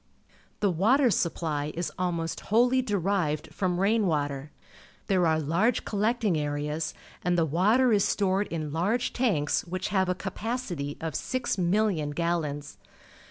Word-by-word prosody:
The 200 Hz, -2 st, +3 dB
water 235 Hz, -, +3 dB
supply 155 Hz, -4 st, -1 dB
is 170 Hz, +1 st, -2 dB
almost 170 Hz, -2 st, -2 dB
whoUj^ 245 Hz, +4 st, +3 dB
derived 185 Hz, -7 st, -1 dB
from 180 Hz, -2 st, -1 dB
rain 210 Hz, +1 st, +2 dB
water. 145 Hz, -3 st, -1 dB, 0.6 s
There 185 Hz, -3 st, +2 dB
are 160 Hz, 0 st, +2 dB
large 170 Hz, -, +1 dB
collecting 215 Hz, -2 st, +1 dB
areas, 150 Hz, +2 st, -2 dB, 0.3 s
and 175 Hz, 0 st, +1 dB
the 165 Hz, -, +3 dB
water 215 Hz, -, +3 dB
is 200 Hz, -2 st, +4 dB
stored 195 Hz, 0 st, +1 dB
in 155 Hz, -3 st, -4 dB
large 205 Hz, +10 st, 0 dB
tanks 195 Hz, -, +1 dB
which 185 Hz, +3 st, -4 dB
have 190 Hz, -2 st, +1 dB
a 180 Hz, -, +1 dB
capacity 190 Hz, -, -4 dB
of 160 Hz, -1 st, -4 dB
6,000,000 185 Hz, -, 0 dB
gallons. 155 Hz, -4 st, -2 dB
180 Hz, 135 wpm, -27 LUFS, 155-210 Hz, 0.6 s, is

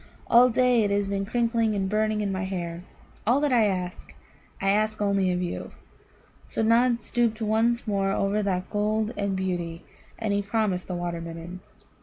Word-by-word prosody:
All 245 Hz, +2 st, +6 dB
day 250 Hz, 0 st, +3 dB
it 205 Hz, -, +1 dB
has 200 Hz, 0 st, +1 dB
been 195 Hz, 0 st, -2 dB
crickling 230 Hz, -1 st, +1 dB
and 195 Hz, -1 st, 0 dB
burning 215 Hz, +1 st, 0 dB
in 200 Hz, -1 st, -1 dB
my 190 Hz, 0 st, -2 dB
hair. 175 Hz, -3 st, -4 dB, 0.5 s
All 245 Hz, +4 st, +4 dB
that 290 Hz, -3 st, +2 dB
I 225 Hz, -3 st, +5 dB
ask, 180 Hz, -2 st, -4 dB, 0.4 s
I 195 Hz, 0 st, +2 dB
ask 215 Hz, +1 st, +1 dB
only 200 Hz, -2 st, +2 dB
of 180 Hz, 0 st, -1 dB
you." 175 Hz, -, -5 dB, 0.7 s
So -, -, -2 dB
Nod 235 Hz, +1 st, +3 dB
stooped 235 Hz, -2 st, 0 dB
once 225 Hz, +2 st, +1 dB
more 195 Hz, -2 st, 0 dB
over 200 Hz, +2 st, 0 dB
that 185 Hz, -2 st, -2 dB
gold 215 Hz, +2 st, 0 dB
and 200 Hz, -1 st, -1 dB
beauty, 175 Hz, -3 st, -3 dB, 0.3 s
and 220 Hz, -3 st, -1 dB
he 200 Hz, -, +1 dB
promised 200 Hz, -3 st, -1 dB
the 180 Hz, -, -3 dB
Water 175 Hz, -1 st, -3 dB
midden. 165 Hz, +2 st, -7 dB
205 Hz, 180 wpm, -26 LUFS, 185-225 Hz, 0.7 s, All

